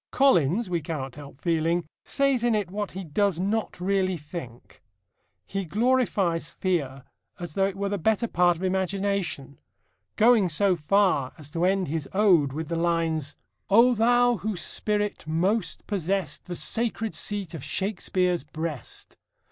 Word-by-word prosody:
Collins, 220 - +3
we 175 -2 -1
cannot 145 -5 -5
help 140 -1 -12
feeling, 165 0 0 0.2
says 275 -3 +1
in 240 -2 +3
it 200 -4 -2
what 205 0 -4
he 190 +1 -5
does 185 +2 0
not 205 +1 -1
really 185 0 +1
think. 145 -6 -10 0.6
He 195 0 -3
glorifies 200 -5 +1
fear 140 -8 -2 0.4
as 175 -3 -6
though 195 +2 +2
it 195 - -5
were 200 0 -2
the 200 0 -2
better 220 +6 +1
part 175 -3 +3
of 180 - -8
imagination, 190 -6 -1 0.6
going 220 -4 +5
so 185 +4 +2
far 170 -4 +2
as 150 -2 -10
to 165 +3 0
end 190 -1 +1
his 155 -1 -3
ode 185 -9 +4
with 155 +3 -4
the 170 - -1
lines: 165 -3 0 0.3
O 235 +5 +6
thou 245 +1 +3
whose 200 -4 -2
spirit 210 -5 -1
most 185 +8 0
possessed, 190 -5 -2
The 180 - -5
sacred 225 +2 -1
seat 205 -4 -2
of 155 -5 -7
Shakespeare's 180 -2 -1
breast! 160 -4 -6
185 Hz, 150 wpm, -26 LUFS, 160-205 Hz, 0.6 s, O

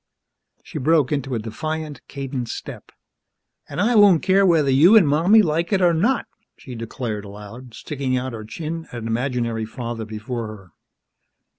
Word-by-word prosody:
She - - -7
broke 150 0 +2
into 135 -3 -2
a - - 0
defiant, 150 +7 -5
cadenced 135 -4 -5
step. - - -10 0.8
"An' - - -5
I 220 +6 +2
won't 205 -7 +6
care 195 +1 +4
whether 155 -6 +3
you 165 +12 +7
an' 200 - +6
Mommy 170 +10 +5
like 165 +1 -1
it 195 - +3
or 175 -2 +4
not!" 225 +10 +1 0.3
she 130 - -10
declared 115 -2 -5
aloud, 105 +4 -11
sticking 135 -3 -3
out 130 0 -4
her 110 -1 -6
chin 160 +8 -6
at - - -13
an 115 -1 -6
imaginary 115 -1 -1
father 115 0 -6
before 110 +2 -5
her. 100 -5 -11
135 Hz, 165 wpm, -22 LUFS, 115-165 Hz, 0.8 s, you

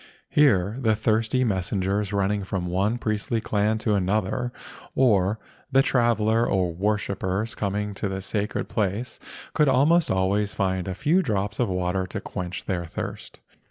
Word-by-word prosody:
Here 110 -7 +3
the 110 -4 +2
thirsty 110 +3 +1
messengers 100 -1 0
running 100 0 0
from 95 -1 -3
one 95 +6 0
priestly 110 0 -1
clan 110 0 0
to 110 - +3
another, 105 +5 0 0.4
or 105 -5 +3 0.3
the 135 0 +5
traveller 115 -3 +2
or 90 -3 +1
worshippers 100 +2 -1
coming 105 0 -2
to 100 +1 -3
the 95 0 -3
sacred 105 +2 -2
place, 105 +3 -2 0.3
could 150 -2 +3
almost 150 +6 +4
always 100 +2 +1
find 95 -2 -1
a 95 - -3
few 155 - +2
drops 100 - -2
of 120 -4 +1
water 90 0 -1
to - - -4
quench 90 +1 -5
their 90 -2 -1
thirst. 80 - -7
105 Hz, 150 wpm, -25 LUFS, 95-115 Hz, 0.4 s, the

